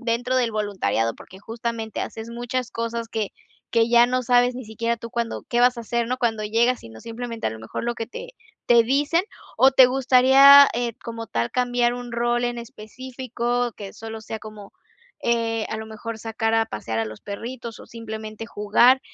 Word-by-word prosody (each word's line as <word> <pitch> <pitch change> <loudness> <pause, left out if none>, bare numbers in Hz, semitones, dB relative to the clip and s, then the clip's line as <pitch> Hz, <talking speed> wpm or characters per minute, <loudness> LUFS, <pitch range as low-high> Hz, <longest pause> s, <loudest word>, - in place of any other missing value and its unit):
dentro 245 +1 -1
del 245 -3 +2
voluntariado? 200 - -1
Porque, 190 - -14
justamente 225 0 -5
haces 225 +1 -6
muchas 245 +1 -4
cosas, 230 0 -3
que 220 -2 -3 0.4
que 230 -1 +3
ya 235 0 +6
no 255 0 -1
sabes 245 +1 +3
ni 255 - -7
siquiera 230 +2 -2
tú 230 0 -9
cuándo 235 -2 -3
qué 240 0 +1
vas 245 0 +4
a - - -5
hacer, 235 +1 -1
¿no?, 255 +1 -1
cuando 225 -3 0
llegas, 235 +4 +1
sino 110 -1 -12
simplemente, 230 0 -5
a - - 0
lo 110 0 -9
mejor 110 - -6
lo 240 - -1
que 225 -1 -5
te - - -9 0.3
te 235 -1 +6
dicen, 290 +7 +2 0.3
¿o 265 - +6
te 260 -1 +8
gustaría, 270 +2 +7
eh, 240 -1 -1
como 230 -1 -6
tal 115 0 -1
cambiar 245 -1 +1
un 245 0 -7
rol 240 +1 0
en 240 0 -2
específico, 240 +1 -4
que 200 -1 -9
solo 225 0 -8
sea 220 0 -6
como, 215 -2 -11 0.5
eh, 230 -2 0
a - - -3
lo 220 0 -6
mejor 220 +1 -7
sacar 225 0 -1
a 225 0 +2
pasear 110 - -4
a 110 - 0
los 110 0 -9
perritos, 230 +3 -7
o - - -12
simplemente 220 -1 -7
jugar? 235 +5 +4
235 Hz, 195 wpm, -23 LUFS, 220-245 Hz, 0.5 s, te